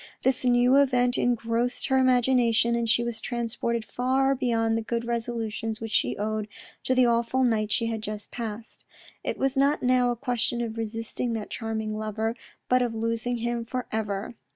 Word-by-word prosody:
This 260 -1 +2
new 245 +1 +4
event 250 -3 +3
engrossed 235 0 0
her 265 0 +4
imagination, 245 -2 +3
and 235 -1 0
she 235 +1 +3
was 235 -2 -4
transported 235 -1 -2
far 265 +3 +1
beyond 230 -4 +1
the 225 - 0
good 235 +1 -2
resolutions 230 -2 -3
which 225 -1 -6
she 125 - +1
owed 215 0 -2 0.4
to 260 - +2
the 255 -1 +5
awful 235 +2 +2
night 220 -3 +1
she 230 - +2
had 225 -1 -2
just 210 0 -5
passed. 225 -1 -6 0.4
It - - -2
was 270 0 0
not 280 +2 +2
now 250 -1 +3
a 240 - 0
question 240 -1 -1
of 225 -2 -3
resisting 225 +1 -3
that 215 -2 -5
charming 220 -2 -3
lover, 215 +1 -2 0.3
but 255 0 +3
of 240 -2 -1
losing 230 +2 -1
him 240 -1 -1
for 250 +2 -4
ever. 210 0 -2
235 Hz, 175 wpm, -26 LUFS, 225-245 Hz, 0.4 s, the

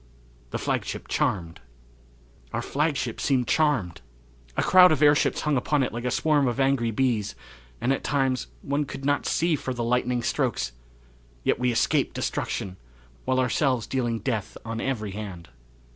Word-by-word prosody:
The - - -3
Flagship - - -3
Charmed! 85 -2 -1 0.9
Our - - -2
flagship 145 -5 -1
seemed 130 -3 +1
charmed. 135 - +1 0.6
A - - +2
crowd 180 -1 +7
of 155 -1 +2
airships 145 0 +4
hung 150 -2 +1
upon 140 +3 +1
it 125 - -2
like 120 +1 -4
a - - +1
swarm 145 +1 +2
of 120 +2 -1
angry 135 -3 +2
bees, 115 -3 0 0.4
and, 130 - +2
at - - -3
times, 135 -3 0 0.2
one 145 +1 0
could 135 0 -7
not 145 0 +1
see 170 -1 +2
for 130 -2 -4
the 120 - -2
lightning 125 0 0
strokes 65 - 0 0.7
yet - - +1
we 125 0 +2
escaped 115 - +1
destruction, 95 -1 -3 0.5
while 130 0 +1
ourselves 130 -1 +1
dealing 120 -3 -1
death 110 -4 -3
on 115 0 -4
every 110 -7 -2
hand. 95 - -7
125 Hz, 160 wpm, -26 LUFS, 115-140 Hz, 0.9 s, crowd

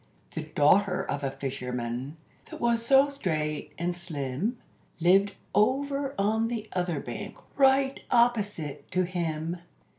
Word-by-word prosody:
The - - -4
daughter 180 +6 +3
of 145 - -3
a 135 - +1
fisherman, 130 0 -4 0.3
that - - -8
was 235 -1 +2
so 270 +3 +6
straight 155 - -2
and 175 +2 -1
slim, 170 - -2 0.4
Lived 195 +4 +4 0.2
over 275 +5 +1
on 220 +3 +2
the 225 -2 -4
other 180 -4 -1
bank, 120 -3 -7 0.2
right 270 0 +3
opposite 210 - +1
to 185 +1 +3
him. 170 -1 -2
180 Hz, 125 wpm, -28 LUFS, 150-235 Hz, 0.4 s, so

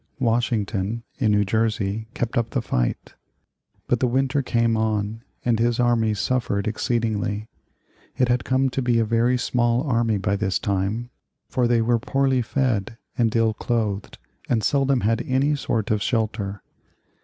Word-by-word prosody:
Washington 115 -3 0 0.2
in 110 -5 +3
New 105 0 +3
Jersey 110 0 -1
kept 120 -1 -2
up 115 -1 +1
the - - -1
fight, - - -2 0.7
but 125 - +1
the 130 - +2
winter 135 +3 +1
came 115 -3 +1
on 110 0 -1 0.2
and 115 -2 +2
his 120 +1 +1
army 115 -3 +2
suffered 110 -2 -1
exceedingly. 110 -2 -1 0.7
It 125 -1 +3
had 120 0 +1
come 130 0 +1
to 135 - -1
be 120 -2 +2
a 115 - +3
very 115 +3 +2
small 120 0 +1
army 115 -6 +1
by 100 +1 0
this 100 -2 0
time, 100 +5 -2 0.4
for 125 -2 +1
they 120 -1 +3
were 120 0 +2
poorly 135 +1 +1
fed 115 -4 -1 0.2
and 115 -2 +1
ill 115 -1 +3
clothed 105 -3 -2 0.3
and 115 -3 +1
seldom 135 -2 +2
had 115 +2 +1
any 135 +3 +2
sort 115 -7 -1
of 105 -1 +1
shelter. 105 -4 -1
115 Hz, 155 wpm, -23 LUFS, 105-125 Hz, 0.7 s, in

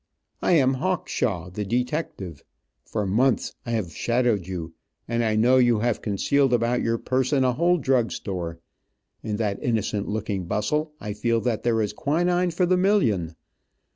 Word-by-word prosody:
I - - +2
am 135 -5 +4
Hawkshaw, 110 - -1
the 105 +3 -3
detective. 120 - -3 0.4
For 105 -2 -2
months 120 +7 +1
I - - -2
have 100 -7 -2
shadowed 120 -6 +1
you, 85 -3 -5 0.3
and 115 0 0
I 110 -1 +1
know 120 +4 +4
you 120 -3 +4
have 120 -1 0
concealed 130 +6 +1
about 120 +1 +2
your 115 0 0
person 130 +3 +1
a 125 -1 +2
whole 175 +6 +3
drug 130 -6 +1
store. 85 -4 -4 0.6
In 105 -2 -3
that 105 -2 -2
innocent 105 -3 -1
looking 105 -3 -2
bustle 150 - -1
I 105 - -5
feel 115 +2 0
that 115 -3 -1
there 115 -2 +1
is 105 - -3
quinine 175 +8 +1
for 180 +2 +1
the 180 +1 +3
million. 115 - +2
115 Hz, 165 wpm, -25 LUFS, 105-135 Hz, 0.6 s, am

